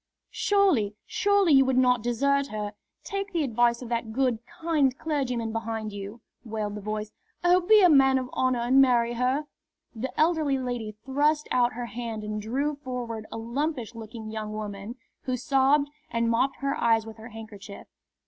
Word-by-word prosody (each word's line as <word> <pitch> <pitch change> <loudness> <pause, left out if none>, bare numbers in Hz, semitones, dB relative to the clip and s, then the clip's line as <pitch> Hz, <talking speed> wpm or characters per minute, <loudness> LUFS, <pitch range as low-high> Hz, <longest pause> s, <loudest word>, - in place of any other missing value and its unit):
"Surely, 355 - +2
surely 405 -5 +3
you 270 -1 +7
would 260 -1 +1
not 250 -2 +4
desert 280 +4 +1
her! 210 -3 -4 0.3
Take 395 +1 -4
the 335 -3 +1
advice 240 -1 +1
of 240 - -8
that 230 -2 -2
good, 250 -1 +1
kind 320 -6 0
clergyman 250 -7 -2
behind 225 -1 -4
you!" 205 +3 -7 0.2
wailed 215 -3 -3
the 210 - -6
voice. 215 +1 -4 0.3
"Oh, 355 +1 +5
be 420 +3 +6
a - - +9
man 270 -4 +5
of 255 -1 -2
honour 255 -2 +1
and 255 +3 +5
marry 240 -3 +3
her!" 255 +5 0 0.5
The 245 +3 -4
elderly 310 -4 +2
lady 245 -4 -4
thrust 295 +3 +1
out 245 -1 +3
her 240 +1 -4
hand 230 -1 -5
and 210 0 -4
drew 275 +7 -1
forward 245 -5 -5
a - - -5
lumpish 245 +2 -3
looking 220 -1 -8
young 215 -1 -4
woman, 210 +1 -6 0.3
who 255 -1 -1
sobbed 275 +2 +3 0.2
and 230 0 0
mopped 260 +4 +1
her 275 0 0
eyes 225 -1 +3
with 225 0 -10
her 225 +2 -10
handkerchief. 215 -3 -10
245 Hz, 175 wpm, -27 LUFS, 220-280 Hz, 0.5 s, a